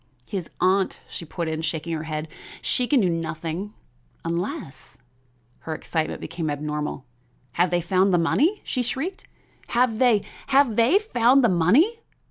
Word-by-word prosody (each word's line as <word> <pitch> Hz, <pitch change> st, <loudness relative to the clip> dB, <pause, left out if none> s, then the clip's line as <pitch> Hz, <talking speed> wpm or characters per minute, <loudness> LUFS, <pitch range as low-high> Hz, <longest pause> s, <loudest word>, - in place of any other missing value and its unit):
"His 190 Hz, -5 st, -5 dB
aunt," 190 Hz, +1 st, +2 dB
she 170 Hz, -, -7 dB
put 170 Hz, +1 st, -4 dB
in, 160 Hz, 0 st, -2 dB
shaking 165 Hz, 0 st, -3 dB
her 160 Hz, 0 st, -3 dB
head. 155 Hz, 0 st, -4 dB, 0.3 s
"She 250 Hz, -, 0 dB
can 275 Hz, -3 st, +4 dB
do 190 Hz, -, +3 dB
nothing, 165 Hz, +4 st, -3 dB, 0.5 s
unless 175 Hz, -, -4 dB, 0.3 s
" 120 Hz, 0 st, -38 dB
Her 160 Hz, -, -5 dB
excitement 160 Hz, 0 st, -3 dB
became 165 Hz, -1 st, -4 dB
abnormal. 150 Hz, -1 st, -3 dB, 0.5 s
"Have 175 Hz, +7 st, +2 dB
they 175 Hz, 0 st, +1 dB
found 185 Hz, +3 st, +2 dB
the 175 Hz, -, +4 dB
money?" 300 Hz, -, +2 dB
she 255 Hz, -, -2 dB
shrieked; 270 Hz, -, -3 dB, 0.4 s
"have 235 Hz, -2 st, +1 dB
they 235 Hz, -6 st, +4 dB, 0.2 s
have 270 Hz, -4 st, +4 dB
they 235 Hz, -, +5 dB
found 265 Hz, -, +3 dB
the 240 Hz, -, +5 dB
money?" 230 Hz, -, +3 dB
180 Hz, 155 wpm, -24 LUFS, 160-245 Hz, 0.5 s, they